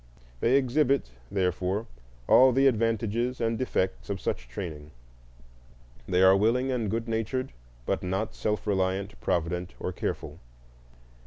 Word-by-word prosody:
They 120 Hz, -, +3 dB
exhibit, 135 Hz, -, +2 dB, 0.2 s
therefore, 95 Hz, +2 st, -1 dB, 0.4 s
all 130 Hz, +1 st, +7 dB
the 135 Hz, +2 st, +3 dB
advantages 115 Hz, 0 st, +1 dB
and 115 Hz, 0 st, 0 dB
defects 95 Hz, -6 st, -2 dB
of 100 Hz, -2 st, -2 dB
such 60 Hz, -, -3 dB
training; 75 Hz, +3 st, -6 dB, 1.2 s
they 90 Hz, 0 st, +3 dB
are 95 Hz, 0 st, +7 dB
willing 120 Hz, +6 st, +2 dB
and 115 Hz, -5 st, -1 dB
good 115 Hz, +3 st, -2 dB
natured, 115 Hz, +3 st, -2 dB, 0.3 s
but -, -, -1 dB
not 95 Hz, +4 st, -2 dB
self 105 Hz, -1 st, -2 dB
reliant, 95 Hz, 0 st, -1 dB
provident, 90 Hz, +1 st, -1 dB
or -, -, -3 dB
careful. -, -, -4 dB
110 Hz, 130 wpm, -28 LUFS, 95-120 Hz, 1.2 s, all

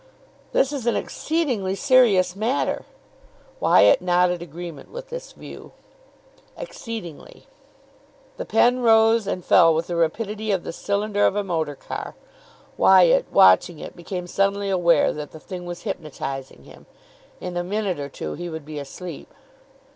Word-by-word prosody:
"This 275 Hz, +2 st, +1 dB
is 260 Hz, -5 st, -4 dB
an 235 Hz, -, +2 dB
exceedingly 250 Hz, -, -2 dB
serious 215 Hz, -8 st, +3 dB
matter." 225 Hz, +7 st, -1 dB, 0.7 s
Wyatt 285 Hz, -, +5 dB
nodded 180 Hz, -1 st, +2 dB
agreement 170 Hz, -2 st, -9 dB
with -, -, -9 dB
this -, -, -7 dB
view. -, -, -12 dB, 0.8 s
"Exceedingly." 225 Hz, -, -8 dB, 0.9 s
The -, -, -5 dB
pen 240 Hz, +4 st, +3 dB
rose 225 Hz, -2 st, +4 dB
and 180 Hz, -3 st, -3 dB
fell 165 Hz, -2 st, +5 dB
with 165 Hz, +1 st, -1 dB
the 175 Hz, -, -4 dB
rapidity 210 Hz, +6 st, -2 dB
of 190 Hz, -4 st, 0 dB
the -, -, -6 dB
cylinder 205 Hz, +2 st, -1 dB
of -, -, -1 dB
a 205 Hz, -, 0 dB
motor 160 Hz, -6 st, -2 dB
car. -, -, -7 dB, 0.6 s
Wyatt, 185 Hz, -3 st, +5 dB
watching 95 Hz, -, +5 dB
it, -, -, -9 dB
became 180 Hz, +1 st, -6 dB
suddenly 200 Hz, +2 st, 0 dB
aware 170 Hz, -4 st, +3 dB
that 150 Hz, -1 st, -7 dB
the 160 Hz, -, -10 dB
thing 180 Hz, +1 st, -8 dB
was 175 Hz, 0 st, -7 dB
hypnotising 135 Hz, -, -6 dB
him. -, -, -16 dB, 0.5 s
In 180 Hz, -1 st, -6 dB
a 175 Hz, -, -1 dB
minute 195 Hz, -2 st, -2 dB
or 140 Hz, 0 st, -5 dB
two -, -, -6 dB
he 175 Hz, 0 st, -6 dB
would 160 Hz, -3 st, -7 dB
be 150 Hz, -1 st, -6 dB
asleep. 160 Hz, +3 st, -9 dB
185 Hz, 145 wpm, -23 LUFS, 170-220 Hz, 0.9 s, Wyatt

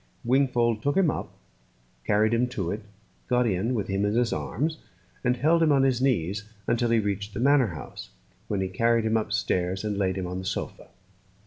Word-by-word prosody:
Wingfold 120 Hz, -3 st, +2 dB
took 145 Hz, +6 st, 0 dB
him 180 Hz, -6 st, +4 dB
up, -, -, -5 dB, 0.7 s
carried 110 Hz, +2 st, +2 dB
him 120 Hz, +2 st, +2 dB
to 100 Hz, -9 st, -3 dB
it, 105 Hz, -, -4 dB, 0.5 s
got 125 Hz, 0 st, +2 dB
in 110 Hz, +4 st, 0 dB
with 105 Hz, -, -2 dB
him 95 Hz, +1 st, -1 dB
in 105 Hz, +1 st, +1 dB
his 120 Hz, 0 st, +2 dB
arms, 155 Hz, +2 st, -2 dB, 0.4 s
and 125 Hz, -1 st, +1 dB
held 160 Hz, +6 st, +3 dB
him 160 Hz, -2 st, +4 dB
on 135 Hz, -2 st, +4 dB
his 130 Hz, -2 st, +2 dB
knees 105 Hz, -6 st, 0 dB, 0.2 s
until 120 Hz, 0 st, +1 dB
he 115 Hz, -, +3 dB
reached 100 Hz, -1 st, -2 dB
the -, -, -3 dB
manor 135 Hz, 0 st, +4 dB
house, -, -, -9 dB, 0.4 s
when 100 Hz, -2 st, -1 dB
he 95 Hz, -, 0 dB
carried 115 Hz, +4 st, +2 dB
him 110 Hz, 0 st, +1 dB
upstairs 95 Hz, -3 st, -1 dB
and 105 Hz, -2 st, -2 dB
laid 95 Hz, -2 st, +1 dB
him 95 Hz, -2 st, -3 dB
on 90 Hz, +1 st, -4 dB
the 95 Hz, -, -7 dB
sofa. -, -, -4 dB
115 Hz, 200 wpm, -26 LUFS, 100-125 Hz, 0.7 s, him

